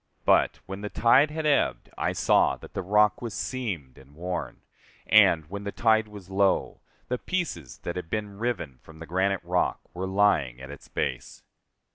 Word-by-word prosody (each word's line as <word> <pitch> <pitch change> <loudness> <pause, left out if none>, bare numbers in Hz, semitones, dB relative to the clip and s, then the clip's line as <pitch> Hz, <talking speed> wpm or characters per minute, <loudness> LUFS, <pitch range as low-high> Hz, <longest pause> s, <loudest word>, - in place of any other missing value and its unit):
But, - - +3
when 95 +1 -7
the 105 - -4
tide 130 +8 +4
had 155 +1 -4
ebbed, 150 -2 +1
I - - -1
saw - - +3
that - - -13
the - - -2
rock 105 +3 +3
was 115 -5 -5
seamed 95 - -4
and 70 +2 -18
worn; 90 +2 -5 0.4
and, 80 -2 +5
when 100 +3 -6
the 100 - -4
tide 110 -1 +2
was 105 -3 -11
low, 100 0 +1 0.3
the 125 0 -2
pieces 170 - -3
that 85 - -4
had 85 -2 -6
been 105 -1 -4
riven 110 - -3
from 80 - -15
the 80 - -9
granite 95 +2 0
rock 90 +1 0
were 95 +2 -4
lying 95 -11 +2
at 65 +1 -9
its 70 - -12
base. - - -4
100 Hz, 180 wpm, -27 LUFS, 85-110 Hz, 0.4 s, and